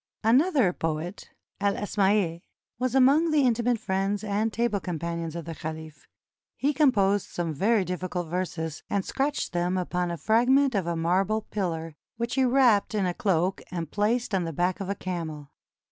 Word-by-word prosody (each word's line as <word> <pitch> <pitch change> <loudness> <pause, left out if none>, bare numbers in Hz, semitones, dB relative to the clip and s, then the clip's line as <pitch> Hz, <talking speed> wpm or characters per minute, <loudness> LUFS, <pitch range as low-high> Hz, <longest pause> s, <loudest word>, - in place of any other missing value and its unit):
Another 255 - +4
poet, 165 +4 -4 0.3
El 200 0 +1
Asmaiy, 195 -4 +1 0.4
was 255 0 -1
among 280 +6 +5
the 305 -2 +3
intimate 240 -1 +2
friends 195 0 -1
and 215 +2 0
table 230 -2 0
companions 170 -2 -4
of 170 - -5
the 165 - -5
caliph. 160 -1 -8 0.5
He 290 +2 +1
composed 205 - +3
some 170 -2 -3
very 200 +6 +2
difficult 180 0 -3
verses, 165 -2 -3
and 200 -2 -1
scratched 280 -4 -2
them 175 +1 0
upon 180 -1 -1
a 170 - -3
fragment 255 - +3
of 195 -5 0
a 170 - -1
marble 190 +6 +1
pillar, 165 -5 -3 0.2
which 235 +1 -2
he 265 - +2
wrapped 245 -5 +3
in 200 -3 +1
a 180 - 0
cloak 185 -1 0
and 170 -4 -5
placed 225 +2 0
on 190 -2 +2
the 165 - -3
back 175 +4 0
of 195 -1 -4
a 200 - -1
camel. 160 -6 -5
195 Hz, 170 wpm, -27 LUFS, 170-230 Hz, 0.5 s, among